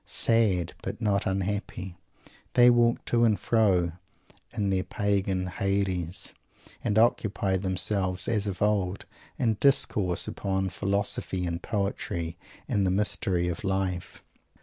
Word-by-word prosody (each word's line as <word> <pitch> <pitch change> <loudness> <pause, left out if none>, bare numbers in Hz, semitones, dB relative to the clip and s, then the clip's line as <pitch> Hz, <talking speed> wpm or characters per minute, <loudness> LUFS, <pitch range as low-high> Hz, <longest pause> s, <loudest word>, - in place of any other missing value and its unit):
Sad, 100 -7 +2
but - - -5
not 100 -4 +1
unhappy, 95 -1 -3 0.6
they 125 0 +7
walk 120 0 +2
to 120 0 +2
and 110 -3 +3
fro 95 -7 +2 0.6
in 100 -2 -1
their 95 -1 +1
Pagan 95 -1 -1
Hades, 95 -1 -2 0.5
and 105 - 0
occupy 105 -4 +2
themselves, 95 -1 0
as 105 -3 0
of 100 0 -2
old, 100 -3 0 0.3
in 115 -4 +1
discoursing 105 -10 +2
upon 95 -1 -2
philosophy 100 -1 -1
and 85 0 -3
poetry 90 -5 -3 0.3
and 100 - +1
the 95 - +2
Mystery 95 -2 0
of 85 +2 -4
Life. 95 -2 -2
95 Hz, 125 wpm, -27 LUFS, 90-105 Hz, 0.6 s, they